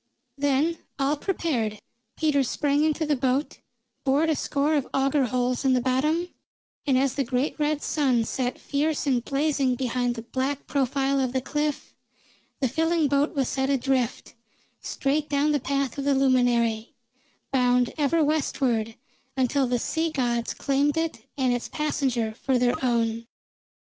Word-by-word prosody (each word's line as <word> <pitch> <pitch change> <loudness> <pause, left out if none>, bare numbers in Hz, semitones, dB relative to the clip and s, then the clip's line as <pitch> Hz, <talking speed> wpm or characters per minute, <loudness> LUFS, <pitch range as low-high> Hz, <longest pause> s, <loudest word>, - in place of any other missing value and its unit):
Then, 285 +4 +1 0.2
all 280 +1 +1
prepared, 275 - -2 0.4
Peters 285 -4 +2
sprang 290 0 +1
into 315 +1 +1
the 295 -1 +1
boat, 265 +2 -1 0.4
bored 290 +4 +2
a - - +1
score 285 +2 0
of 285 -4 0
auger 270 0 +2
holes 250 +2 -1
in 265 -1 +3
the 255 - +3
bottom, 300 +8 0 0.6
and 265 -2 +4
as 265 0 +2
the 275 - 0
great 255 +3 -1
red 300 0 0
sun 260 -6 +1
set 250 +1 -2
fierce 300 +2 -1
and 255 -4 +1
blazing 275 -2 +1
behind 245 -1 -1
the 230 - -6
black 265 +4 -3
profile 275 0 0
of 255 -2 0
the 260 - +1
cliff, 295 +2 -2 0.7
the 265 - +3
filling 325 +2 +1
boat 285 +3 +1
was 270 -3 +1
set 265 0 -1
adrift, 265 -3 0 0.5
straight 295 +2 -1
down 290 +1 +2
the 295 - +2
path 275 0 -2
of - - -2
the 285 -1 +3
luminary, 245 -4 +2 0.6
bound 250 -2 +2
ever 310 +2 +2
westward, 255 -7 0 0.4
until 260 +1 +2
the 245 0 +1
sea 320 +7 -1
gods 240 -5 -1
claimed 280 +2 +1
it 325 0 -3
and 260 -2 +2
its 245 - -3
passenger 260 -7 -1
for 260 +3 0
their 245 0 +2
own. 230 -2 0
270 Hz, 155 wpm, -25 LUFS, 250-295 Hz, 0.7 s, and